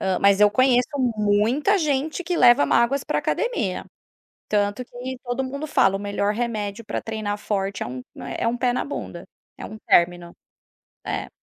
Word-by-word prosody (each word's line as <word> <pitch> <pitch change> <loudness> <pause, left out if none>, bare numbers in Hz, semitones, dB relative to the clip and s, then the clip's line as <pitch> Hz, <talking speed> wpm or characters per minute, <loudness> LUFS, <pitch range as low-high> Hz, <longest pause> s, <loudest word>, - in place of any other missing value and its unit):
Ah, 190 -1 0
mas 200 -1 +4
eu 210 0 +6
conheço 250 +1 +3 0.3
muita 215 - +2
gente 305 +1 -1
que 355 0 -2
leva 245 +2 +6
mágoas 265 +4 +2
para - - -1
a - - 0
academia. 230 - -1 0.6
Tanto 205 +3 0
que 250 +2 -7
todo 245 +1 -2
mundo 280 +4 -5
fala: 195 -9 +3
"O - - -5
melhor 205 0 -1
remédio 220 -2 -3
para - - -3
treinar 215 -2 -4
forte 200 -1 -2
é - - -3
um 125 +1 -7 0.2
é 140 -1 -5
é 230 - +2
um 235 - -1
pé 245 0 +1
na 250 - -1
bunda, 285 - -6 0.3
é - - -9
um 215 - -8
término", 175 0 +2 0.7
é. - - -3
225 Hz, 185 wpm, -23 LUFS, 205-260 Hz, 0.7 s, eu